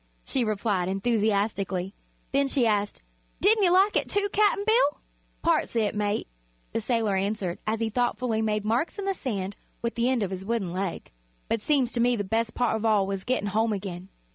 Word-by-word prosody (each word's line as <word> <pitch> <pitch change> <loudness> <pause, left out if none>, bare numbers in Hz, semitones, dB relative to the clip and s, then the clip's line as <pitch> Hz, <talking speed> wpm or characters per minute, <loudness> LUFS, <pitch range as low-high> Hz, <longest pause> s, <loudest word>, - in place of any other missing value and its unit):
she 260 - +1
replied, 205 -4 0
enthusiastically. 200 -2 0 0.4
Then 275 0 +2
she 265 -2 +2
asked: 205 -2 0 0.4
"Didn't 420 +1 +4
you 355 - +5
like 385 +3 +4
it, - - +1
too, 405 0 +1
Cap'n 415 -1 +3
Bill?" 440 -10 +3 0.4
"Parts - - +1
o' - - +3
it, 210 -3 +1
mate," 210 0 -1 0.5
the 225 - 0
sailor 225 -3 0
answered, 195 -2 -2
as 220 +1 0
he 225 - +1
thoughtfully 245 -1 0
made 210 -1 0
marks 235 - 0
in 400 - -4
the 390 - +1
sand 200 - -4 0.3
with 235 - -1
the 235 +1 +1
end 255 -4 +1
of 195 - -3
his 190 0 -5
wooden 200 -4 -2
leg; 185 -1 -4 0.4
"but 225 - -1
seems 265 -2 +2
to 240 - 0
me 245 +1 +3
the 205 - -2
bes' 225 +3 0
part 245 0 0
of 220 - -3
all 215 -3 +3
was 195 -1 -3
gett'n' 245 -5 -1
home 220 +2 +1
again." 190 -2 -6
220 Hz, 200 wpm, -27 LUFS, 200-250 Hz, 0.5 s, you